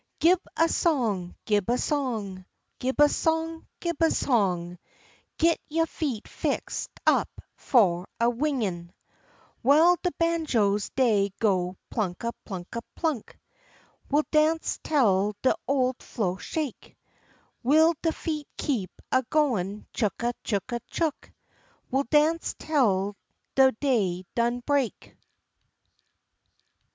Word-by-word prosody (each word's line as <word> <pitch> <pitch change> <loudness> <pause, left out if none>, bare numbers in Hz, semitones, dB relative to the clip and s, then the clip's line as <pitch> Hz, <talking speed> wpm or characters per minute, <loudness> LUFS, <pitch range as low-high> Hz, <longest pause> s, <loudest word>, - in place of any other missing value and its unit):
Gib 355 +2 +5 0.2
a 330 - +4
song, 225 - 0
gib 210 -1 +1
a 245 - +3
song, 220 -12 -2 0.3
Gib 260 +3 -2
a 295 - +8
song, 325 +1 -1
gib 340 -3 -2
a 325 - +5
song, 180 - 0 0.6
Git 335 0 +3
yo' 325 +2 +2
feet 275 -9 -4
fixed - - -3 0.2
up - - +3 0.3
fu' 185 -8 +2
a 235 - +3
wingin'. 230 - -1 0.7
W'ile 315 +7 +6
de 360 - +1
banjos 255 - +1
dey 215 -6 +3
go 185 -4 +1 0.2
plunka, 215 +2 -2 0.2
plunka, 190 +3 -6
plunk, 310 -9 -2 0.7
We'll 295 +2 +2
dance 315 +1 +2
tel 210 -8 +2
de 260 - +4
ole 260 -2 +2
flo' 190 -6 -2
shake; 295 - -5 0.7
W'ile 315 +6 +5
de 325 - +1
feet 305 -3 -4
keep 230 -11 -1 0.2
a 260 - +4
goin' 215 - 0
chooka, 235 +2 -1
chooka, 235 +3 -2
chook, 320 -3 -2 0.6
We'll 270 +2 +1
dance 310 +5 +2
tel 205 -10 +1 0.4
de 265 -1 +6
day 210 -8 0
done 240 +1 0
break. 275 -3 -1
250 Hz, 115 wpm, -27 LUFS, 200-305 Hz, 0.7 s, a